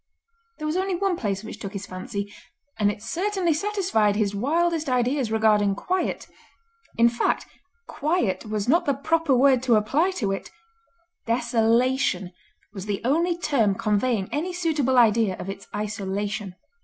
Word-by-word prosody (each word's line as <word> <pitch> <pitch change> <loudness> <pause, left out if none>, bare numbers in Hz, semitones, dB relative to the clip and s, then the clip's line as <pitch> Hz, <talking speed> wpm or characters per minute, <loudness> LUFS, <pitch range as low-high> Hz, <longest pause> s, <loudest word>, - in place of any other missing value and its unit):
There 305 - -6
was 305 +3 -1
only 380 0 0
one 385 0 0
place 200 - -3
which 220 - -8
took 195 -1 -6
his 200 -1 -5
fancy, 200 +2 -6 0.5
and 205 -1 +3
it 210 0 -5
certainly 370 - 0
satisfied 350 - +1
his 205 -1 0
wildest 320 +7 0
ideas 250 -1 +1
regarding 210 -2 +3
quiet; 365 - -2 0.7
in 230 +1 +6
fact, 235 0 0 0.4
quiet 290 - -1
was 215 0 -2
not 335 +7 +3
the 280 - +2
proper 320 +1 +1
word 260 -1 +4
to 250 -3 +3
apply 270 - +2
to 200 -5 0
it—desolation 255 - -1 0.4
was 195 -1 -7
the 200 -1 -2
only 335 +6 +2
term 245 - +1
conveying 215 -1 0
any 340 +5 -2
suitable 305 -7 +1
idea 225 -4 +4
of 195 - -5
its 195 0 -11
isolation. 205 -2 -3
240 Hz, 145 wpm, -24 LUFS, 205-330 Hz, 0.7 s, in